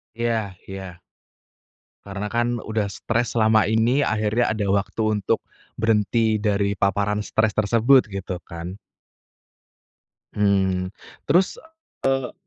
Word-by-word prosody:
Iya 115 Hz, -4 st, -1 dB, 0.2 s
iya. 95 Hz, -3 st, -8 dB, 1.1 s
Karena, 100 Hz, +1 st, -4 dB
kan, 120 Hz, +2 st, 0 dB
udah 110 Hz, -2 st, -2 dB
stres 115 Hz, +4 st, -1 dB
selama 110 Hz, -2 st, +4 dB
ini, 115 Hz, +7 st, +2 dB
akhirnya 110 Hz, +1 st, +1 dB
ada 105 Hz, -2 st, -2 dB
waktu 100 Hz, +3 st, 0 dB, 0.2 s
untuk 100 Hz, -, 0 dB, 0.4 s
berhenti 110 Hz, 0 st, +2 dB
dari 100 Hz, -1 st, 0 dB
paparan 100 Hz, +1 st, 0 dB
stres 110 Hz, -1 st, 0 dB
tersebut, 115 Hz, +5 st, +4 dB
gitu, 95 Hz, -2 st, -4 dB
kan. 85 Hz, +2 st, -7 dB, 1.6 s
Hmm, 95 Hz, -3 st, +1 dB, 0.4 s
terus, 175 Hz, +6 st, +2 dB, 0.6 s
eee 135 Hz, -2 st, -5 dB
105 Hz, 105 wpm, -23 LUFS, 100-115 Hz, 1.6 s, selama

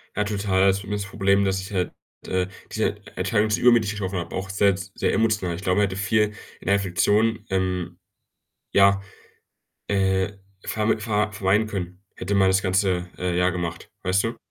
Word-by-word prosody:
Ja, 105 Hz, -, +1 dB
total, 100 Hz, -2 st, 0 dB
also, 95 Hz, 0 st, +3 dB
bei 100 Hz, -, -10 dB
mir 105 Hz, -, -1 dB
ist 100 Hz, -, -2 dB
das 100 Hz, -, -10 dB
Problem, 100 Hz, -1 st, +2 dB
dass 95 Hz, 0 st, 0 dB
ich 95 Hz, +3 st, -9 dB
halt, 90 Hz, -2 st, -1 dB, 0.4 s
äh, 90 Hz, -1 st, 0 dB, 0.2 s
diese -, -, 0 dB, 0.2 s
Entscheidung 105 Hz, +1 st, +1 dB
sehr 105 Hz, -, 0 dB
übermütig 120 Hz, -4 st, +5 dB
getroffen 100 Hz, -2 st, -3 dB
habe, 85 Hz, 0 st, -6 dB
auch 95 Hz, 0 st, -4 dB
sehr 100 Hz, +1 st, +3 dB
s 95 Hz, 0 st, -7 dB
sehr -, -, 0 dB
emotional. 105 Hz, -6 st, +1 dB
Ich 90 Hz, -, -8 dB
glaube, 90 Hz, -1 st, +1 dB
man 105 Hz, -, +4 dB
hätte 95 Hz, -, -5 dB
viel 105 Hz, +2 st, +1 dB, 0.3 s
in -, -, -16 dB
der 100 Hz, -, +4 dB
Reflektion, 105 Hz, +4 st, +1 dB
ähm, 90 Hz, -2 st, -1 dB, 0.7 s
ja, 100 Hz, 0 st, +5 dB, 0.9 s
äh, 95 Hz, -1 st, +1 dB, 0.3 s
verm 110 Hz, +1 st, 0 dB
ver 105 Hz, -1 st, 0 dB
vermeiden 105 Hz, +2 st, +2 dB
können, 90 Hz, -3 st, -5 dB
hätte 100 Hz, +2 st, -2 dB
man 95 Hz, -1 st, +4 dB
das 95 Hz, +1 st, +3 dB
ganze, 95 Hz, -2 st, +1 dB
äh, 90 Hz, -1 st, -1 dB
Jahr 90 Hz, +1 st, +3 dB
gemacht, 85 Hz, -2 st, -5 dB
weißt 95 Hz, +3 st, +2 dB
du? 115 Hz, +1 st, -2 dB
95 Hz, 195 wpm, -24 LUFS, 95-105 Hz, 0.9 s, übermütig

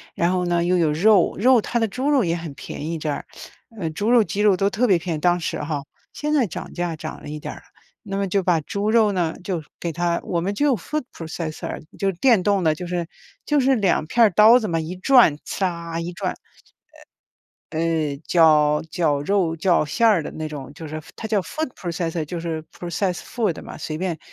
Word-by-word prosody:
然 170 Hz, +2 st, +1 dB
后 180 Hz, -1 st, 0 dB
呢 175 Hz, -1 st, +1 dB
又 180 Hz, +1 st, +2 dB
有 160 Hz, -3 st, +2 dB
肉， 190 Hz, +3 st, +4 dB
肉 245 Hz, +2 st, +5 dB
它 235 Hz, -, -1 dB
的 225 Hz, -, +1 dB
猪 255 Hz, +8 st, -2 dB
肉 275 Hz, -6 st, +4 dB
也 170 Hz, -1 st, 0 dB
很 165 Hz, -4 st, -6 dB
便 140 Hz, +2 st, -7 dB
宜 165 Hz, -, -2 dB
这 155 Hz, -1 st, -3 dB
儿， 145 Hz, -, -3 dB, 0.5 s
呃， 165 Hz, -, -2 dB
猪 205 Hz, +8 st, -2 dB
肉 235 Hz, -3 st, +6 dB
鸡 205 Hz, 0 st, -3 dB
肉 205 Hz, -3 st, +5 dB
都 195 Hz, +2 st, +1 dB
特 235 Hz, +5 st, +1 dB
别 190 Hz, -4 st, +5 dB
便 170 Hz, 0 st, -3 dB
宜， -, -, -6 dB
当 175 Hz, +2 st, +2 dB
时 165 Hz, -, -3 dB
哈， 145 Hz, -2 st, -3 dB, 0.3 s
现 300 Hz, 0 st, -2 dB
在 270 Hz, -6 st, +3 dB
涨 -, -, -7 dB
价 175 Hz, -2 st, -2 dB
涨 155 Hz, 0 st, -7 dB
了 -, -, -9 dB
一 150 Hz, -, -5 dB
点 -, -, -6 dB
儿 -, -, -12 dB
了。 -, -, -15 dB, 0.4 s
那 195 Hz, -1 st, -3 dB
么 200 Hz, -, 0 dB
就 195 Hz, 0 st, 0 dB
把 175 Hz, -3 st, +3 dB
猪 200 Hz, +7 st, -2 dB
肉 220 Hz, -3 st, +4 dB
呢 170 Hz, -4 st, 0 dB
就 175 Hz, -5 st, -2 dB, 0.2 s
给 170 Hz, -, -3 dB
它， 170 Hz, +1 st, 0 dB
我 170 Hz, -2 st, -1 dB
们 195 Hz, +3 st, -1 dB
就 280 Hz, +5 st, +2 dB
food 300 Hz, -, -4 dB
processor， 160 Hz, -1 st, -5 dB, 0.2 s
就 195 Hz, -, +1 dB
是 -, -, -2 dB
电 230 Hz, -8 st, +4 dB
动 200 Hz, -2 st, +2 dB
的， 155 Hz, -2 st, +3 dB
就 180 Hz, +3 st, -6 dB
是 175 Hz, -1 st, -3 dB, 0.4 s
就 295 Hz, -1 st, +2 dB
是 265 Hz, +1 st, +3 dB
2 195 Hz, -8 st, +1 dB
片 235 Hz, +4 st, +4 dB
儿 215 Hz, -, +5 dB
刀 220 Hz, +6 st, +7 dB
子 215 Hz, -, -3 dB
嘛 165 Hz, -, 0 dB
一 160 Hz, +2 st, -3 dB
转， 235 Hz, -, +5 dB
刺 -, -, -3 dB
啦， 170 Hz, -2 st, -2 dB
一 170 Hz, +1 st, -4 dB
转， 175 Hz, -, -3 dB, 1.3 s
呃， 160 Hz, -3 st, -1 dB
绞 150 Hz, -3 st, +4 dB
绞 150 Hz, -5 st, +1 dB
肉 175 Hz, 0 st, +1 dB
绞 170 Hz, -1 st, +2 dB
馅 225 Hz, +10 st, +2 dB
儿 190 Hz, -7 st, +3 dB
的 -, -, -6 dB
那 155 Hz, -1 st, -5 dB
种， 140 Hz, -2 st, -8 dB
就 160 Hz, 0 st, -8 dB
是 155 Hz, -, -8 dB
F 155 Hz, -, -9 dB
它 220 Hz, -, -6 dB
叫 210 Hz, -3 st, +1 dB
food 310 Hz, -, -4 dB
processor， 170 Hz, -2 st, -3 dB
就 170 Hz, +3 st, -5 dB
是 165 Hz, -2 st, -3 dB
process 180 Hz, +2 st, -2 dB
food 215 Hz, -9 st, -2 dB
嘛， -, -, -9 dB
随 155 Hz, 0 st, -5 dB
便 175 Hz, -3 st, -2 dB
175 Hz, 320 characters per minute, -22 LUFS, 160-205 Hz, 1.3 s, 刀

